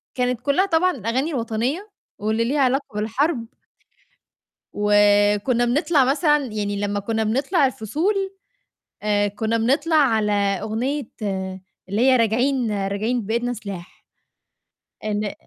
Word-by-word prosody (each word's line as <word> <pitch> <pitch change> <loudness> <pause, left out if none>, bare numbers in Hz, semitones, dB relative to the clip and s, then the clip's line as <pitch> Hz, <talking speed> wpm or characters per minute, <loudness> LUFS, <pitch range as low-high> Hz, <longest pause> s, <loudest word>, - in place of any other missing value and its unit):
كانت 250 -1 -1
كلّها 285 +9 +2
طبعًا 365 0 +2
أغاني 260 +8 0
وطنية 250 - -2 0.3
واللي 220 +2 0
ليها 280 +5 0
علاقة 270 +2 +2
بالحرب. 230 +4 -1 1.3
وكنا 205 +3 +3
بنطلع 285 +3 +2
مثلًا 295 +3 +3
يعني 205 -3 -3
لمّا 205 0 -1
كنا 220 +2 -1
بنطلع 275 - +1
الفصول 290 - -1 0.9
آآ، 205 -1 +2
كنا 220 +3 -1
بنطلع 285 +8 +1
على 225 -8 +3
أغنية 215 +8 -1 0.9
اللي 205 +4 0
هي 260 +1 +5
راجعين، 240 +1 +1 0.2
راجعين 220 +5 -1
بإيدنا 235 +3 -1
سلاح. 200 -6 -9 1.0
إن 210 -1 -2
230 Hz, 115 wpm, -22 LUFS, 210-275 Hz, 1.3 s, هي